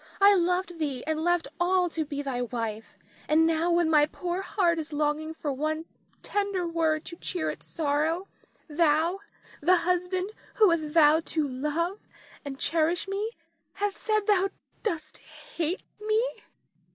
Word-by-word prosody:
I 400 +1 +8
loved 360 -1 0
thee 275 -5 -2
and 315 0 -1
left 350 -1 +2
all 360 0 +3
to 320 -1 -1
be 285 -1 -4
thy 260 -3 -2
wife, 225 -3 -4 0.3
and 315 +2 +4
now 330 +1 +2
when 345 -1 +3
my 300 -2 +5
poor 355 +3 -3
heart 360 -4 +1
is 315 0 -5
longing 305 +2 -1
for 290 -3 -3
one 310 +4 -2 0.4
tender 400 -3 -1
word 320 -2 0
to 340 - -7
cheer 350 -2 -2
its - - -12
sorrow, 320 +4 0 0.4
thou, 325 +3 +2 0.4
the 360 +5 +5
husband 360 +2 0 0.2
who 425 -5 +6
hath 335 - +3
vowed 320 0 +5
to 310 -2 0
love 300 +9 -2 0.4
and 275 -1 -6
cherish 330 +3 +1
me, 410 +4 -2 0.4
hath 410 0 -1
said 430 -1 +1
thou 390 -2 +3 0.3
dost 315 -8 -3
hate 345 -7 -5 0.2
me. 430 +1 +2
330 Hz, 150 wpm, -28 LUFS, 305-365 Hz, 0.4 s, I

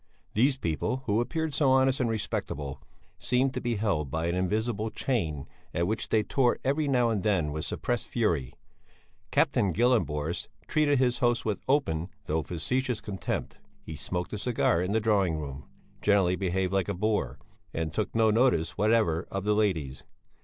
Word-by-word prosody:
These 130 +5 +3
people, 125 - -2
who 105 +2 +2
appeared 160 +4 -2
so 140 -1 +3
honest 130 0 +4
and 125 -3 +1
respectable, 80 -9 -3 0.4
seemed 130 +1 +1
to - - -3
be 120 -1 -1
held 100 -9 0
by 80 +4 -2
an 85 - 0
invisible 105 +4 0
chain 85 - -2 0.3
at 85 - +1
which 110 +5 -2
they 110 -1 +3
tore 125 0 +2
every 145 +3 +1
now 125 -4 +3
and 105 -3 0
then 90 -8 +1
with 75 +1 -3
suppressed 120 -1 -2
fury. 85 - 0 0.7
Captain 100 - +2
Gyllenborst 85 -8 +1 0.2
treated 150 -2 +3
his 125 -1 +2
host 120 -1 +1
with 105 -2 -1
open, 95 - +1 0.2
though 80 +1 0
facetious 120 - -2
contempt. 95 -5 -4 0.2
He 80 - -7
smoked 90 +6 -4
a 105 - -3
cigar 105 -7 +1
in 90 +2 -1
the 110 - +2
drawing 100 -7 +2
room, 70 -3 -6 0.4
generally 95 -3 +3
behaved 95 0 -1
like 95 0 +1
a 100 - -1
boor, 105 - 0 0.3
and 80 -1 -3
took 105 -1 -2
no 110 -1 +4
notice 85 -9 +2
whatever 105 -6 +2
of 95 -1 -3
the 105 +1 +2
ladies. 85 -11 0
105 Hz, 170 wpm, -28 LUFS, 85-120 Hz, 0.7 s, honest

